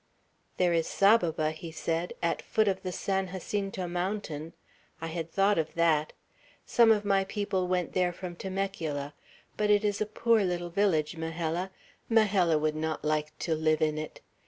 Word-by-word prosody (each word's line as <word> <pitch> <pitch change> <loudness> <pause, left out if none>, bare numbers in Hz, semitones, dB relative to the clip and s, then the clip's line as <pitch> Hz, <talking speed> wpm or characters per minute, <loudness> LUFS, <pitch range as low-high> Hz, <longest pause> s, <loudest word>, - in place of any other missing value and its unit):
"There 180 -1 +3
is 165 -1 +1
Saboba," 170 -7 +3
he 160 +1 -8
said, 165 +1 -2
"at 170 0 0
foot 215 -1 +1
of 190 -1 0
the 185 - -4
San 190 +1 -1
Jacinto 195 0 -3
Mountain; 175 -3 -3 0.5
I 165 - -5
had 165 0 -4
thought 200 0 +3
of 160 - -3
that. 160 -2 +2 0.5
Some 230 -2 +5
of 210 -1 +2
my 195 -1 +3
people 200 -2 -1
went 180 -1 -1
there 180 -1 +2
from 175 0 -7
Temecula; 170 -7 -3 0.4
but 210 0 +1
it 210 0 +4
is 205 0 0
a 215 - +1
poor 225 0 +2
little 175 -2 -2
village, 170 -4 +1
Majella. 165 +2 -2 0.4
Majella 200 -8 +4
would 155 0 0
not 155 0 -3
like 155 0 -1
to 165 - -1
live 155 0 +2
in 155 0 +1
it. 155 - -7
175 Hz, 170 wpm, -29 LUFS, 160-195 Hz, 0.5 s, Some